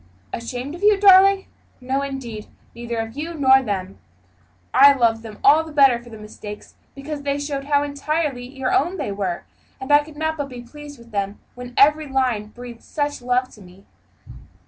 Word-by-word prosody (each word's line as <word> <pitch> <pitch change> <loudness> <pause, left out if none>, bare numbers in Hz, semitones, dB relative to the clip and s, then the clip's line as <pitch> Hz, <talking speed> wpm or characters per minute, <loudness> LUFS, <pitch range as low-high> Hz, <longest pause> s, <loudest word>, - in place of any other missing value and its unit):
"Ashamed 245 +4 -5
of 345 - -9
you, 415 -1 +4
darling? 390 0 +6 0.3
No, 265 +2 -2
indeed, 260 -6 -6 0.3
neither 235 0 -5
of 225 +1 -4
you 325 +4 -5
nor 265 -3 +5
them. 195 -5 -4 0.7
I 280 +2 +8
loved 230 -4 +1
them 220 -2 -10
all 300 +3 +6
the 320 - -10
better 275 -5 +4
for 240 - -14
the 220 - -10
mistakes, 210 -1 -10 0.2
because 285 +1 -6
they 280 0 -1
showed 285 -1 -4
how 285 0 +2
entirely 285 -3 -2
your 265 -1 -3
own 345 +7 +1
they - - -3
were; 195 -3 -3 0.4
and 265 +2 -5
I 290 0 +6
could 300 0 -14
not 315 +1 -2
but 285 -2 -4
be 245 -2 -9
pleased 290 +3 -12
with 235 0 -17
them 200 -1 -3
when 245 0 -10
every 300 +2 +4
line 255 -6 0
breathed 240 +1 -11
such 290 -3 -3
love 250 +1 0
to 210 - -16
me. 185 +1 -17
265 Hz, 190 wpm, -21 LUFS, 235-290 Hz, 0.7 s, I